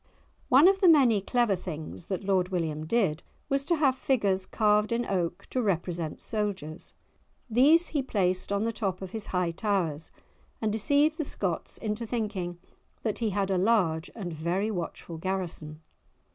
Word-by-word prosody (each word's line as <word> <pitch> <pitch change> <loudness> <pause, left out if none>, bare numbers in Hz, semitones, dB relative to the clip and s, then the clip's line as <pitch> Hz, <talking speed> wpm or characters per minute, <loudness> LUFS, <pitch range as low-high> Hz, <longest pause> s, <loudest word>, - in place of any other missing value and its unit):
One 275 +7 +7
of 390 +1 +3
the 375 - +6
many 260 - +6
clever 235 0 +2
things 165 -2 -7
that 195 -1 -3
Lord 190 -2 +1
William 160 -4 -2
did 175 -7 +1 0.3
was 275 0 +1
to 340 - +2
have 280 -5 +3
figures 200 -9 0
carved 210 0 +2
in 235 +1 0
oak 175 -3 -2
to 255 - 0
represent 175 -5 -2
soldiers; 200 -7 -4 0.5
these 285 +9 +5
he 295 - 0
placed 185 -7 0
on 200 +1 +1
the 230 0 -1
top 195 -4 -3
of 185 - -7
his 220 -2 -6
high 180 -2 0
towers, 165 -5 -1 0.5
and 220 -2 0
deceived 285 - +2
the - - +1
Scots 185 - -3
into 220 +1 -3
thinking 205 -7 -3 0.5
that 215 -3 -1
he 225 -2 0
had 195 -1 -1
a 185 - +2
large 180 -6 +2
and 185 -7 -5
very 175 +7 -1
watchful 170 -3 -5
garrison! 165 -4 -4
200 Hz, 165 wpm, -28 LUFS, 175-230 Hz, 0.5 s, One